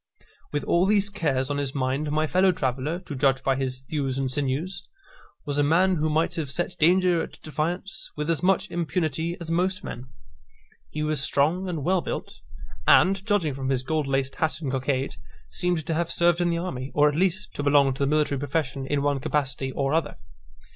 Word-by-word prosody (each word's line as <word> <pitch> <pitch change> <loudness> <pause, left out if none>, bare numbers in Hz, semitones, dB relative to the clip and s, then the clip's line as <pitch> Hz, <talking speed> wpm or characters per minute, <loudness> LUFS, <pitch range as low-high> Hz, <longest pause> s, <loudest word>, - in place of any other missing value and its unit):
With 145 - -1
all 175 +2 +2
these 200 -1 +2
cares 145 -9 -1
on 145 - -1
his 140 -1 -3
mind, 135 +3 -1
my 155 +1 +1
fellow 185 +4 +3
traveller, 135 +1 -2
to 155 -6 -7
judge 135 -1 +2
by 135 - +2
his 130 -1 -2
thews 135 -1 -2
and 135 -1 -1
sinews, 145 +6 -2 0.6
was 145 0 -1
a - - +4
man 180 +5 +3
who 155 +1 0
might 160 +2 +1
have 155 -4 -2
set 175 +5 -2
danger 175 +1 +4
at - - -8
defiance 175 +5 -3
with 150 0 -3
as 165 -2 +1
much 190 +2 +1
impunity 165 0 -1
as 165 -1 -5
most 185 +3 0
men. 125 +2 -7 0.8
He 150 - -3
was 155 -2 0
strong 160 +8 +1
and 160 -5 -3
well 185 +3 +2
built; - - -5 0.5
and, 195 +1 +5
judging 195 -9 +1
from 135 0 -3
his 130 -2 +1
gold 155 +1 -1
laced 135 0 -1
hat 160 -1 0
and 145 -5 -3
cockade, 130 0 -1 0.3
seemed 175 -4 -1
to 165 - -1
have 170 +1 -1
served 175 0 +3
in 175 - +2
the 170 - 0
army, 135 -7 -4
or, 150 0 +5
at 145 - +1
least, 190 +4 0
to - - -4
belong 140 -1 +4
to 130 - -11
the 140 - +2
military 150 -2 +1
profession 140 -1 -2
in 140 0 0
one 145 -1 +1
capacity 135 -2 -1
or 135 +1 -1
other. 165 +1 0
150 Hz, 200 wpm, -25 LUFS, 135-175 Hz, 0.8 s, and